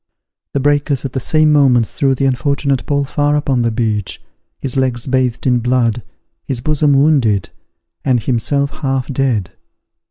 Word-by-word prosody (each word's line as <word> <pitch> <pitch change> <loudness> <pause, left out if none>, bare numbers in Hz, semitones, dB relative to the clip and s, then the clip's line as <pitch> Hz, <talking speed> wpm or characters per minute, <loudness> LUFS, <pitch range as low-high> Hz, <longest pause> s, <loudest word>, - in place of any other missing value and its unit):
The - - +2
breakers 145 -1 +1
at 130 - -5
the 130 - -1
same 155 +3 +2
moment 130 -5 +4
threw 135 -1 0
the 135 - -1
unfortunate 135 +1 0
Paul 145 -1 +1
far 145 +1 0
upon 140 -4 0
the 115 - +1
beach, 110 -3 -2 0.4
his 135 -1 -4
legs 130 -3 0
bathed 130 -2 -1
in 125 -2 +3
blood, 120 -1 0 0.4
his 130 -3 -3
bosom 150 +2 +1
wounded, 135 - +2 0.5
and 130 -3 +2
himself 140 +5 -1
half 135 -3 -1
dead. 125 -9 -1
135 Hz, 155 wpm, -16 LUFS, 120-140 Hz, 0.5 s, moment